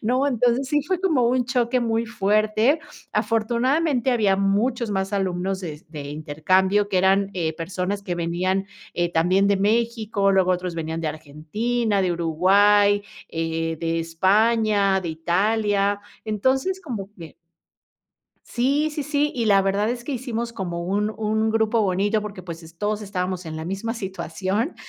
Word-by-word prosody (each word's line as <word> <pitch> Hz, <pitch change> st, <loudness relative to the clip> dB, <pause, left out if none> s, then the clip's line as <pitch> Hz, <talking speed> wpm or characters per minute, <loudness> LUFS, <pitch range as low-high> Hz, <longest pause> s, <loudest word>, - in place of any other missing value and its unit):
¿No? 255 Hz, +5 st, +1 dB
Entonces 250 Hz, 0 st, +1 dB
sí, 295 Hz, +1 st, +2 dB
fue 370 Hz, +2 st, 0 dB
como 300 Hz, -11 st, +2 dB
un 250 Hz, 0 st, +1 dB
choque 250 Hz, 0 st, +1 dB
muy 230 Hz, 0 st, 0 dB
fuerte. 215 Hz, +6 st, +2 dB, 0.3 s
Afortunadamente, 250 Hz, +4 st, +1 dB
había 210 Hz, -5 st, +2 dB
muchos 215 Hz, +5 st, 0 dB
más 190 Hz, 0 st, -2 dB
alumnos 190 Hz, -1 st, -1 dB
de 155 Hz, -3 st, -7 dB
de 150 Hz, -2 st, -7 dB
intercambio, 185 Hz, +8 st, +1 dB
que 190 Hz, -, -1 dB
eran, 195 Hz, +1 st, +3 dB
eh, 165 Hz, -3 st, -1 dB
personas 180 Hz, +4 st, -3 dB
que 180 Hz, -3 st, -3 dB
venían, 175 Hz, +3 st, -1 dB, 0.3 s
eh, 175 Hz, 0 st, -1 dB
también 180 Hz, +4 st, +3 dB
de 200 Hz, -, +3 dB
México, 215 Hz, -1 st, +1 dB
luego 185 Hz, -1 st, +3 dB
otros 180 Hz, -1 st, -3 dB
venían 160 Hz, 0 st, -3 dB
de 155 Hz, -, 0 dB
Argentina, 195 Hz, +10 st, -2 dB
de 180 Hz, -, +1 dB
Uruguay, 200 Hz, +5 st, +4 dB, 0.3 s
eh, 165 Hz, 0 st, -2 dB
de 165 Hz, 0 st, -1 dB
España, 200 Hz, +3 st, +2 dB
de 170 Hz, -, -4 dB
Italia. 165 Hz, +2 st, -3 dB, 0.9 s
Entonces, 265 Hz, -, 0 dB
como 220 Hz, -, -6 dB
que 165 Hz, -3 st, -10 dB, 1.1 s
Sí, 280 Hz, +5 st, +1 dB
sí, 300 Hz, -1 st, -4 dB
sí, 295 Hz, +1 st, 0 dB
y 235 Hz, -3 st, -1 dB
la 200 Hz, -2 st, +5 dB
verdad, 200 Hz, +2 st, +1 dB
es 240 Hz, 0 st, -3 dB
que 285 Hz, -, -4 dB
hicimos 235 Hz, -2 st, -3 dB
como 175 Hz, -5 st, -4 dB
un 205 Hz, +4 st, 0 dB
un 220 Hz, 0 st, 0 dB
grupo 220 Hz, 0 st, +2 dB
bonito, 205 Hz, +2 st, +1 dB
porque, 205 Hz, -3 st, -7 dB
pues, 170 Hz, -1 st, -8 dB
es 165 Hz, +1 st, -14 dB
todos 210 Hz, +3 st, -1 dB
estábamos 185 Hz, -3 st, -3 dB
en 155 Hz, 0 st, -5 dB
la 160 Hz, -, -5 dB
misma 195 Hz, +6 st, -3 dB
situación. 190 Hz, -, -3 dB
200 Hz, 155 wpm, -23 LUFS, 180-235 Hz, 1.1 s, la